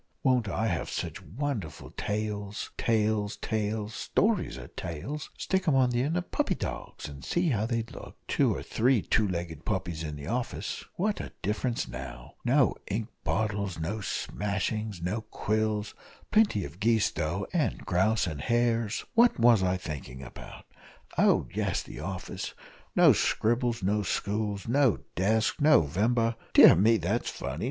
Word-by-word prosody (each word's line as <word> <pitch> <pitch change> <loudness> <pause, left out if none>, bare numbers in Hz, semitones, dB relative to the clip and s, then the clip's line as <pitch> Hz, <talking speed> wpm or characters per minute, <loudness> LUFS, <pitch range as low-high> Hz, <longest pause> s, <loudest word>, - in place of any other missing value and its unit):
won't 125 -5 +3
I 110 - -1
have 85 -6 -1
sich - - -4
wonderful 105 - -4
tales 105 0 -3
tales 110 -2 +1
tails 110 0 -2
stories 205 - 0
are 65 -1 -9
tails 135 - -5
stick 190 -1 -1
'em 150 - +4
on 130 -2 +4
the 120 0 +1
end 155 +6 0
of 175 - -4
puppy - - +1
dogs, - - -5
and 70 -2 -10
see 175 -1 +1
how 110 -4 +1
they'd 115 -1 -2
look - - -10
two - - +3
or - - -3
three 120 -2 +2
two 110 -2 +2
legged 85 -4 -4
puppies 85 -6 -2
in 75 -2 -4
the 70 -1 -8
office 120 +6 -3
what 205 +3 0
a - - -7
difference 115 +4 -1
now! 65 +2 -8
no 130 +1 +4
ink 110 +3 -2
bottles, 100 0 -1
no 95 +7 -2
smashings, 105 0 -2
no 105 +6 -1
quills, 110 -1 -1 0.4
plenty 210 - +3
of 90 - -10
geese, 110 0 +3
though, 85 +6 -2
and 165 -4 0
grouse 105 +4 +2
and 75 -5 -4
hares 115 - +1
what 235 - +5
was 115 -3 +6
I 95 0 +1
thinking 70 -6 -7
about? 65 - -11 0.5
Oh, - - +4
yes - - 0
the - - -9
office 95 +4 -5 0.4
no - - +7
scribbles 120 -1 +1
no 105 +3 +2
stools, 105 +1 -2
no 130 -1 +3
desks, 110 - +1
No 150 - +6
vember 115 +9 +1 0.2
dear - - +10
me, 110 +6 +5
that's 105 +6 -1
funny! 70 +5 -5
105 Hz, 160 wpm, -29 LUFS, 95-120 Hz, 0.5 s, dear